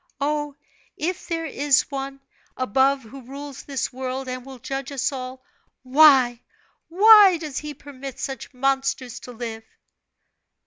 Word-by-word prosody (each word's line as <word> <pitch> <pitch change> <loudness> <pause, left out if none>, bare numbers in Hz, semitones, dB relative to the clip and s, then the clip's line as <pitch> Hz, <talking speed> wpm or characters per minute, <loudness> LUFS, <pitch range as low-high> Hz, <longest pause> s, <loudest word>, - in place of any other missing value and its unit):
Oh, 295 0 -1 0.4
if 350 +4 -3
there 330 -1 -2
is 285 -2 +2
One 275 0 -5 0.4
above 265 +3 +2
who 265 +5 -11
rules 275 +2 -9
this 270 -2 -4
world, 260 +1 -4
and 255 0 -5
will 265 0 -10
judge 270 +2 -5
us 275 0 -1
all, 255 -1 -7 0.4
why, 260 -3 +5 0.5
why 400 0 +8
does 305 -4 -5
He 300 -1 -7
permit 275 -1 -9
such 270 -1 -5
monsters 270 -1 -1
to 250 - -10
live?" 225 -2 -6
270 Hz, 135 wpm, -23 LUFS, 255-290 Hz, 0.5 s, why